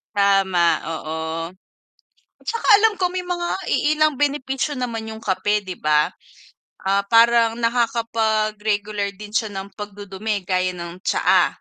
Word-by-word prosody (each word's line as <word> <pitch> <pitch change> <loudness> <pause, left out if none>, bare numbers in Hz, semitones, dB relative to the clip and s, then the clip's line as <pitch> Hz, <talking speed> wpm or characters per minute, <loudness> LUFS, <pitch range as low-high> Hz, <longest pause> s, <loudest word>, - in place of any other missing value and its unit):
Tama, 195 -4 +3
oo. 160 0 -4 1.2
At - - -26
saka 460 -1 -2 0.2
alam 445 -1 +5
ko 360 -1 +1
may 365 0 -3
mga 350 -1 -2 0.2
iilang 305 0 +2
benepisyo 280 -1 -1
naman 225 -3 -4
yung 220 0 -9
kape, 205 +1 0
'di 185 -2 -7
ba? 150 0 +2 0.7
Ah, 195 +1 +1
parang 230 +1 +4
nakakapag-regular 215 -3 0
din 205 +2 -11
siya 220 -3 0
ng 195 0 -7
pag-dudumi 205 -1 -5
gaya 185 -1 +1
ng 175 0 -8
tsaa. - - +3
210 Hz, 130 wpm, -21 LUFS, 195-235 Hz, 1.2 s, alam